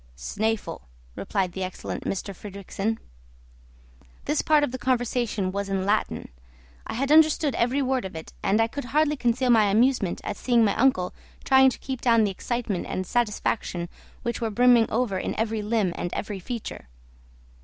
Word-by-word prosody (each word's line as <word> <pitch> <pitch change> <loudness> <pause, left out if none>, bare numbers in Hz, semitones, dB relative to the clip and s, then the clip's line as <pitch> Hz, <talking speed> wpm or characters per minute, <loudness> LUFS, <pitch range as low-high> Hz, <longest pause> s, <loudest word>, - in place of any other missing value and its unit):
"Snæfell," 205 - -2 0.3
replied 190 -3 -1
the 190 +2 -4
excellent 185 0 -5
M. - - +1 0.2
Fridrikssen. 200 +3 -4 1.3
This 295 +1 +1
part 305 -1 +4
of 290 - 0
the 260 - -5
conversation 240 -6 0
was 200 +1 -3
in 190 -1 -1
Latin; 210 +2 0 0.6
I - - -4
had 275 +4 -1
understood 310 -2 +5
every 255 +4 +1
word 260 -1 0
of 190 -3 -7
it, 160 - -8
and 205 +3 +2
I 225 - +5
could 260 +4 -6
hardly 300 +4 +2
conceal 250 -1 +1
my 220 -3 +6
amusement 215 -1 +2
at 200 - -4
seeing 240 -3 +3
my 205 - +1
uncle 225 -9 +2 0.3
trying 265 0 +6
to - - -6
keep 260 -3 -5
down 230 -2 +4
the 205 - +1
excitement 220 -2 -3
and 185 - -3
satisfaction 210 -6 -1 0.3
which 235 -1 -3
were 225 - 0
brimming 240 +1 +4
over 220 -5 0
in - - -3
every 220 -1 0
limb 210 -4 0
and 175 - -3
every 205 -2 -4
feature. 230 - -6
225 Hz, 170 wpm, -25 LUFS, 195-255 Hz, 1.3 s, my